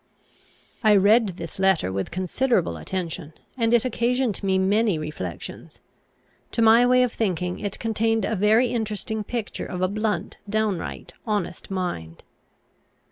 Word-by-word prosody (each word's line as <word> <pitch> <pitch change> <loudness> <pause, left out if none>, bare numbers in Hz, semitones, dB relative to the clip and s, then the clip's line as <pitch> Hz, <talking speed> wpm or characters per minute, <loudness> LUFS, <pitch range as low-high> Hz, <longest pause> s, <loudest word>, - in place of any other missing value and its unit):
I 215 -1 +6
read 200 -1 +4
this 170 +3 -8
letter 190 - +2
with 95 0 -3
considerable 185 - 0
attention, 165 - -5 0.2
and 230 -3 +1
it 240 0 +4
occasioned 245 -2 0
me 190 -2 +1
many 200 0 +2
reflections. 150 - -7 0.7
To - - 0
my 230 +2 +6
way 250 0 +5
of 245 - -1
thinking 180 -4 -1
it 205 -2 -4
contained 225 0 0
a 225 - -1
very 215 +5 +4
interesting 220 -2 -2
picture 230 0 -4
of 180 0 -3
a - - +4
blunt, 215 +2 -2
downright, 215 -4 -2
honest 205 -5 -2
mind. 175 - -4
205 Hz, 135 wpm, -24 LUFS, 180-225 Hz, 0.7 s, I